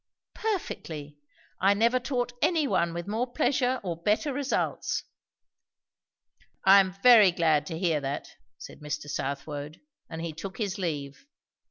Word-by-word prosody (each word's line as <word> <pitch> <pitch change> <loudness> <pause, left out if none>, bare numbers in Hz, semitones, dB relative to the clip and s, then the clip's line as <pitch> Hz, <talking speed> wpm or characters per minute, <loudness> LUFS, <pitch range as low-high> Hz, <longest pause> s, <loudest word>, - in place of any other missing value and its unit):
"Perfectly. 155 - -4 0.4
I 195 +2 +4
never 235 +4 +3
taught 245 -1 -2
any 320 -5 +2
one 170 -8 +1
with 170 +1 -5
more 235 +4 -2
pleasure 260 -3 +1
or 175 -3 -3
better 215 - +1
results." 280 0 -1 1.6
"I 195 +1 +9
am 190 -1 +1
very 230 -6 +8
glad 160 -3 +2
to 165 - -4
hear 165 -3 +1
that," 140 +1 -4 0.3
said - - -11
Mr. 150 0 -5
Southwode. 145 +2 -4 0.3
And 165 0 -6
he 165 -2 -4
took 190 +5 -7
his 205 -3 -3
leave. 145 - -4
185 Hz, 140 wpm, -28 LUFS, 155-245 Hz, 1.6 s, I